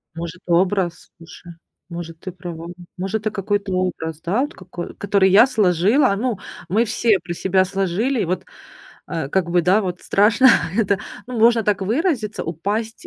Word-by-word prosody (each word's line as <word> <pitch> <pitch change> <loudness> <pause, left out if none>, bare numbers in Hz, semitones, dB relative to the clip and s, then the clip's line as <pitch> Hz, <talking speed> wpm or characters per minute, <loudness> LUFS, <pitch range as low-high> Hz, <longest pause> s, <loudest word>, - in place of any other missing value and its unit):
Может 170 +1 -7
образ. 180 0 0
Слушай, 170 +1 -13 0.4
может 170 -1 -7
ты 185 - -7
права, 170 -2 -8 0.3
может 195 +4 -2
это 215 0 -2
какой-то 205 -1 -2
образ, 165 -4 -2
да, 190 +9 0
вот 295 +4 -3
какой 180 -1 -8
который 200 -1 +2
я 210 +6 +7
сложила. 210 - +3
Ну 235 0 -1 0.3
мы 220 +6 +2
все 220 -2 +2
про 170 +1 -6
себя 190 +2 +1
сложили. 195 +7 -1
Вот, 185 +2 -3 0.6
а, 160 -5 -4
как 170 +2 0
бы, 175 0 +3
да, 190 +5 +3
вот 180 -2 -4
страшно 225 +6 +4 0.3
это, 200 -3 +2 0.3
ну 250 -2 -5
можно 230 +1 +5
так 205 -2 0
выразиться: 230 - -1
упасть 205 +8 -4
190 Hz, 160 wpm, -21 LUFS, 175-220 Hz, 0.6 s, я